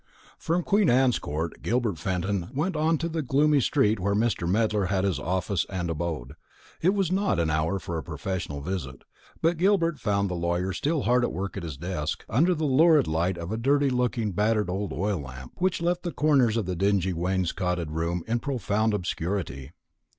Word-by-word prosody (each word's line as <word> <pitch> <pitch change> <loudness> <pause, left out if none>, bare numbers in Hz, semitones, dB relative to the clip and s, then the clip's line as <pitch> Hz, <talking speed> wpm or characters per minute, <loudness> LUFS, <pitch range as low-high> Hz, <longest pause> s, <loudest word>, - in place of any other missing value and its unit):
From 175 +2 0
Queen 200 -1 +3
Anne's 125 -1 +3
Court 80 +3 -4
Gilbert 115 -8 0
Fenton 90 +1 -2
went 160 +6 0
on 160 +1 +2
to 165 - -2
the 165 -1 -2
gloomy 145 +2 +3
street 110 -3 +2
where 100 +2 0
Mr. 105 -6 0
Medler 105 0 +2
had 95 0 0
his 95 -3 0
office 95 +1 -1
and 90 -3 -2
abode. 75 -5 -4 0.5
It 185 +5 +3
was 195 -4 +1
not 190 - +1
an 80 -2 +1
hour 80 +5 0
for 85 -2 -4
a - - -7
professional 80 -2 -4
visit; 75 -6 -5 0.4
but 165 +1 +3
Gilbert 170 -4 +2
found 100 -3 +1
the 90 - -3
lawyer 85 +2 -1
still 150 - 0
hard 125 +2 +3
at - - 0
work 95 +3 -4
at 100 - -4
his 80 -5 -6
desk, 85 -1 -3
under 170 +9 +3
the 155 0 -1
lurid 150 +1 +5
light 85 +3 0
of 85 +2 -5
a 110 - -1
dirty 140 +3 +2
looking 120 -4 0
battered 105 0 +1
old 100 +2 -3
oil 100 +1 -1
lamp, 65 -2 -9
which 180 -2 0
left 175 +1 +1
the 175 - -3
corners 135 -8 +3
of 110 - 0
the 90 0 -2
dingy 95 0 +1
wainscoted 90 -1 -1
room 85 +2 -2
in 115 +1 0
profound 110 -4 0
obscurity. 85 -6 -3
100 Hz, 195 wpm, -26 LUFS, 85-135 Hz, 0.5 s, lurid